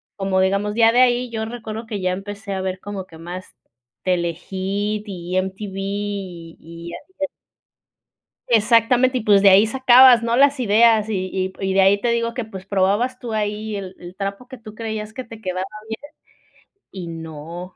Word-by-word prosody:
como 195 -1 0
digamos 200 +2 +1
ya 225 0 +5
de 245 - +3
ahí, 250 0 +3
yo 220 -1 -3
recuerdo 225 -1 -6
que 210 -3 -5
ya 185 0 +1
empecé 200 +2 -6
a 190 - -2
ver 185 0 -3
como 200 -2 -6
que 165 -3 -15
más 175 +3 -9 0.5
Telehit 175 -2 -1 0.7
y 180 -1 -4
MTV 190 +1 -6
y 195 -4 -5
y 170 +1 -10
así 375 - -11
de 290 - -1 1.2
exactamente 240 +3 +4
y - - -4
pues, 205 -2 +5
de 200 - +8
ahí 195 +3 +6
sacabas, 255 0 +7
¿no?, 235 +1 0
las 280 0 +4
ideas 220 -1 +4
y 190 -3 -1
y 190 0 -2
y 190 0 -1
de 195 - +4
ahí 195 +1 +4
te 240 - 0
digo 235 0 0
que 245 -2 -3
pues, 190 -3 -10
probabas 205 +6 +1
tú 235 -3 -6
ahí, 210 0 -2
el 190 -2 -7
el 175 0 -10
trapo 200 +5 -5
que 260 -2 -10
tú 215 -1 -12
creías 220 -1 -5
que 255 - -6
te 225 -1 -12
quedaba 185 -2 -3 0.2
bien 280 +7 -7 0.8
y 185 -3 -7
no. 165 +2 -8
205 Hz, 185 wpm, -21 LUFS, 190-230 Hz, 1.2 s, de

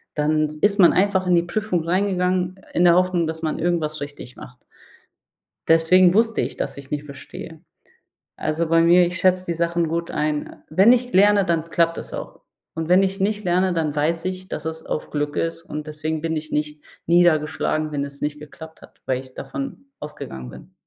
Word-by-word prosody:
dann 155 +1 +1 0.2
ist 205 0 +2
man 175 - +7
einfach 190 -1 +2
in 180 - +4
die 170 - +3
Prüfung 180 -2 -2
reingegangen 185 0 0
in 175 - +3
der 170 0 +6
Hoffnung, 180 -2 +2
dass 160 0 -5
man 155 -1 -2
irgendwas 160 -3 -1
richtig 145 -3 -9
macht. 125 0 -13 1.0
Deswegen 175 +3 +5
wusste 225 +2 +2
ich, - - -4
dass - - -4
ich 140 -1 -11
nicht 150 0 -3
bestehe. 150 +3 -10 0.8
Also, 155 +2 -1
bei 165 0 +4
mir, 175 +1 +5
ich 175 +1 -4
schätze 185 0 +2
die 170 - -1
Sachen 170 0 0
gut 170 +1 -3
ein. 150 0 -1
Äh, - - -13
wenn 195 +9 +6
ich 250 0 0
lerne, 200 +1 +5
dann 165 -1 -1
klappt 165 0 +2
das - - -8
auch. - - -7 0.3
Und 160 0 -4
wenn 180 +2 +5
ich 195 +1 -3
nicht 205 +1 -1
lerne, 180 +1 +2
dann 155 -3 -1
weiß 165 +3 0
ich, 185 0 -5
dass 155 - -6
es 160 0 -5
auf - - -4
Glück 145 0 -2
ist 165 0 -2
und 150 -1 -7
deswegen 155 +1 -4
bin 165 0 -2
ich 155 0 -5
nicht 150 0 -3 0.2
niedergeschlagen, 155 -2 +2
wenn 140 -1 -1
es 140 0 -9
nicht 150 0 -3
geklappt 160 +2 -12
hat, - - -17
weil 130 -1 0
ich 130 -1 -15
davon 275 -2 -6 0.2
ausgegangen 65 - -8
bin. 60 +1 -14
165 Hz, 200 wpm, -22 LUFS, 150-185 Hz, 1.0 s, man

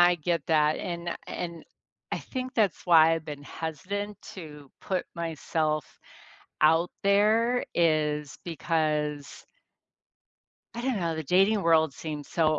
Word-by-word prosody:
I 175 0 +6
get 170 -1 -2
that, 155 -1 +3
and 170 -1 -4
a - - -2
and 170 -2 -5 0.5
I - - 0
think 255 -1 -5
that's 205 -7 +1
why 165 -1 +7
I've 160 -1 -5
been 145 -2 -7
hesitant 185 +8 -5
to 150 -6 -10
put 185 -2 -2
myself 155 -2 -1 0.8
out 160 +3 +4
there 220 +5 +3
is 150 -3 +1
because 150 -3 -2 1.3
I 235 - -5
don't 255 -5 0
know, 165 -2 -1
the 160 - -3
dating 195 +6 +3
world 160 -4 +4
seems 150 -2 -6
so 155 -2 +2
165 Hz, 135 wpm, -28 LUFS, 155-185 Hz, 1.3 s, why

